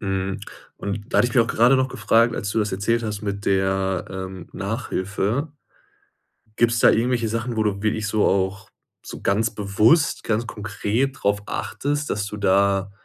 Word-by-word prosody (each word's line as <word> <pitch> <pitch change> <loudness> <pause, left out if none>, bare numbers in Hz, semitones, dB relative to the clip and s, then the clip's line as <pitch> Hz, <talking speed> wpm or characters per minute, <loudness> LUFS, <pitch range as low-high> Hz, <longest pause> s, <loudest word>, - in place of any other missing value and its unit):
Mhm. 95 -1 -2 0.4
Und 100 +1 -5
da - - +3
hatte 120 - +4
ich - - -8
mich 120 - +6
auch - - -4
gerade 120 +4 +4
noch 130 0 +1
gefragt, 115 -1 +2
als 100 - -3
du 110 - -1
das 105 -1 0
erzählt 110 +5 0
hast 105 -1 -4
mit 100 -1 -4
der, 95 -1 +1
ähm, 95 -2 -7
Nachhilfe 110 - -2 1.1
gibt's 120 0 +3
da - - +6
irgendwelche 120 0 +1
Sachen, 115 +2 -3
wo 110 - +2
du 100 -2 -1
wirklich 110 0 0
so 105 0 +1
auch 95 0 0 0.3
so - - -8
ganz 110 +3 +1
bewusst, 105 - +2
ganz 115 +1 0
konkret 105 +6 -2
drauf 100 0 +2
achtest, 145 +6 -3
dass 100 -1 -2
du 105 0 -6
da 100 0 +2
105 Hz, 175 wpm, -23 LUFS, 100-115 Hz, 1.1 s, mich